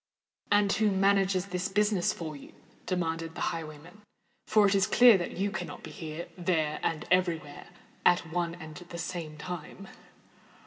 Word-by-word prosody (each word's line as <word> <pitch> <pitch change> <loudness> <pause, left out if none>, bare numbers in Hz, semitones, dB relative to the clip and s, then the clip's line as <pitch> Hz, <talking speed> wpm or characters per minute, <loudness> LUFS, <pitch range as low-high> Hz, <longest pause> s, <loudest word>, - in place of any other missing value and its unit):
"And 205 -1 +4
who 215 -1 +2
manages 195 -1 +2
this 180 -1 -2
business 210 -3 +2
for 160 -3 -6
you?" 140 - -12 0.3
demanded 165 -2 -2
the - - -1
highwayman; 165 +4 -9 0.5
"for 215 -1 +5
it 200 - +3
is 195 -1 +3
clear 245 -3 +7
that 175 - -5
you 200 +2 0
cannot - - -6
be - - -8
here—there—and 160 -1 -2
every 180 -2 +3
where 145 -2 -12 0.4
at 175 -2 +3
one 170 -1 -1
and 160 -3 -10
the 175 +1 -9
same 165 -3 -5
time." 180 +4 -7
175 Hz, 150 wpm, -29 LUFS, 160-195 Hz, 0.5 s, clear